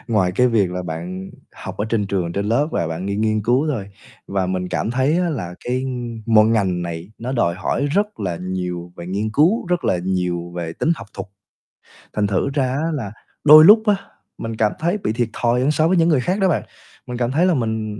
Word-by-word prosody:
ngoài 100 Hz, -6 st, +2 dB
cái 125 Hz, +7 st, +3 dB
việc 105 Hz, -6 st, +2 dB
là 90 Hz, 0 st, -3 dB
bạn 90 Hz, +3 st, -6 dB, 0.2 s
học -, -, -8 dB
ở 105 Hz, -, 0 dB
trên 110 Hz, -3 st, 0 dB
trường, 90 Hz, -4 st, -2 dB
trên 100 Hz, +2 st, -2 dB
lớp 140 Hz, +8 st, +1 dB
và 85 Hz, -, 0 dB
bạn 80 Hz, +4 st, -4 dB
nghiên 100 Hz, +1 st, -2 dB
nghiên 110 Hz, -1 st, +1 dB
cứu 125 Hz, +7 st, +2 dB
thôi. 105 Hz, -8 st, -4 dB, 0.4 s
Và 95 Hz, -2 st, 0 dB
mình 90 Hz, 0 st, -2 dB
cảm 100 Hz, +5 st, -2 dB
thấy 135 Hz, +7 st, +1 dB
á 180 Hz, -1 st, +1 dB
là, 90 Hz, -, -4 dB
cái 130 Hz, +2 st, -1 dB, 0.4 s
mỗi 110 Hz, -2 st, +5 dB
ngành 95 Hz, -6 st, +1 dB
này 85 Hz, +4 st, -6 dB
nó 125 Hz, +3 st, -4 dB
đòi 100 Hz, -10 st, +1 dB
hỏi 95 Hz, +10 st, -1 dB
rất 205 Hz, +8 st, -1 dB
là 90 Hz, -4 st, -2 dB
nhiều 90 Hz, -1 st, -4 dB
về 85 Hz, -, -8 dB
nghiên 100 Hz, +4 st, -2 dB
cứu, 165 Hz, -, +2 dB
rất 180 Hz, 0 st, -1 dB
là 90 Hz, -, +1 dB
nhiều 90 Hz, -2 st, -2 dB
về 85 Hz, -2 st, -4 dB
tính 160 Hz, -, 0 dB
học 115 Hz, -, -9 dB
thuật, 95 Hz, 0 st, -6 dB, 0.9 s
thành 105 Hz, -1 st, +1 dB
thử 100 Hz, +7 st, 0 dB
ra 140 Hz, -3 st, +1 dB
á 155 Hz, +5 st, -1 dB
là 115 Hz, -9 st, -4 dB, 0.3 s
đôi 155 Hz, +1 st, +9 dB
lúc 215 Hz, +3 st, +8 dB
á, 205 Hz, -, +5 dB, 0.4 s
mình 115 Hz, 0 st, -5 dB
cảm 105 Hz, -1 st, +2 dB
thấy 175 Hz, +5 st, 0 dB
bị 150 Hz, -, -2 dB
thiệt 120 Hz, 0 st, -1 dB
thòi 120 Hz, +1 st, +1 dB
hơn 140 Hz, +4 st, +2 dB
so 155 Hz, +2 st, +2 dB
với 185 Hz, -, +2 dB
những 165 Hz, 0 st, +4 dB
người 140 Hz, -6 st, +3 dB
khác 185 Hz, +9 st, -1 dB
đó 190 Hz, -2 st, +3 dB
bạn, -, -, 0 dB, 0.4 s
mình 125 Hz, -1 st, -5 dB
cảm 120 Hz, 0 st, 0 dB
thấy 165 Hz, +6 st, +2 dB
là 185 Hz, -, +3 dB
mình 110 Hz, -5 st, -2 dB
110 Hz, 235 wpm, -20 LUFS, 95-140 Hz, 0.9 s, đôi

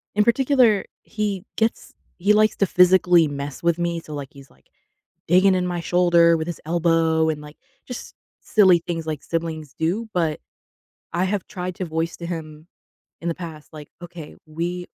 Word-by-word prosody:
In 210 Hz, -, +4 dB
particular, 235 Hz, -3 st, +3 dB, 0.2 s
he 205 Hz, -4 st, -3 dB
gets 225 Hz, +1 st, -1 dB, 0.3 s
he 200 Hz, +4 st, +3 dB
likes 215 Hz, 0 st, +3 dB
to 200 Hz, -, +3 dB
physically 180 Hz, -2 st, +5 dB
mess 140 Hz, -1 st, -6 dB
with 170 Hz, -1 st, +2 dB
me, 170 Hz, -1 st, -1 dB
so, 155 Hz, -2 st, -10 dB
like, 140 Hz, -2 st, -6 dB
he's, 140 Hz, -1 st, -15 dB
like, -, -, -27 dB, 0.6 s
digging 185 Hz, +3 st, +5 dB
in 180 Hz, -1 st, 0 dB
my 175 Hz, -1 st, -2 dB
shoulder 170 Hz, -1 st, +4 dB
with 160 Hz, 0 st, -3 dB
his 170 Hz, -2 st, -6 dB
elbow 165 Hz, -1 st, +2 dB
and, 150 Hz, -1 st, -4 dB
like, 150 Hz, 0 st, -12 dB, 0.3 s
just 250 Hz, -, -8 dB, 0.3 s
silly 190 Hz, -5 st, +5 dB
things 165 Hz, -2 st, -3 dB
like 155 Hz, -3 st, -4 dB
siblings 160 Hz, -3 st, -4 dB
do, 180 Hz, +9 st, -1 dB
but 165 Hz, -4 st, 0 dB, 0.7 s
I 170 Hz, +2 st, 0 dB
have 195 Hz, 0 st, -2 dB
tried 180 Hz, 0 st, -5 dB
to 185 Hz, -, -3 dB
voice 165 Hz, 0 st, -3 dB
to 170 Hz, -, -6 dB
him 155 Hz, -2 st, -7 dB, 0.6 s
in 170 Hz, -, -4 dB
the -, -, 0 dB
past, 160 Hz, -4 st, -9 dB
like, 150 Hz, -2 st, -10 dB
"Okay. 170 Hz, -3 st, -10 dB
We 175 Hz, +3 st, -4 dB
170 Hz, 175 wpm, -22 LUFS, 160-185 Hz, 0.7 s, physically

